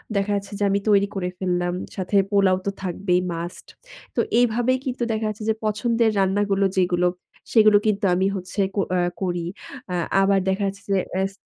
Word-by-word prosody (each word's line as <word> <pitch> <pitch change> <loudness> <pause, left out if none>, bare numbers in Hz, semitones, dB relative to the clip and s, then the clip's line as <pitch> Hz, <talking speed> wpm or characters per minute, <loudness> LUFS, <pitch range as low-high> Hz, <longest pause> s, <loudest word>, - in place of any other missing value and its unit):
দেখা 200 +1 0
যাচ্ছে 200 0 -4
যে, - - 0
আমি 200 +1 +2
তৈরি 200 -1 +4
করে 180 -2 -2
ফেললাম। 175 -1 -1 0.2
সাথে 190 +1 -3 0.2
পোলাও 195 -2 +4
তো - - +1
থাকবেই 180 0 0
মাস্ট। 170 +1 -6 0.5
তো - - 0 0.2
এইভাবেই 245 +2 +2
কিন্তু 250 -2 -2
দেখা 220 0 -1
যাচ্ছে 215 0 -6
যে, - - +4
পছন্দের 225 +2 +1
রান্নাগুলো 195 +1 +2
যেগুলো 180 -1 +2 0.4
সেগুলো 215 -2 +6
কিন্তু 205 0 +1
আমি 185 +2 +1
হচ্ছে 185 +2 -6 0.4
আ - - +2 0.2
করি। 175 -2 -1 0.5
আ - - -1 0.3
আবার 195 0 +3
দেখা 190 +2 0
যাচ্ছে 200 +1 -6
যে, - - +3 0.2
এস 195 0 -1
195 Hz, 175 wpm, -23 LUFS, 185-210 Hz, 0.5 s, সেগুলো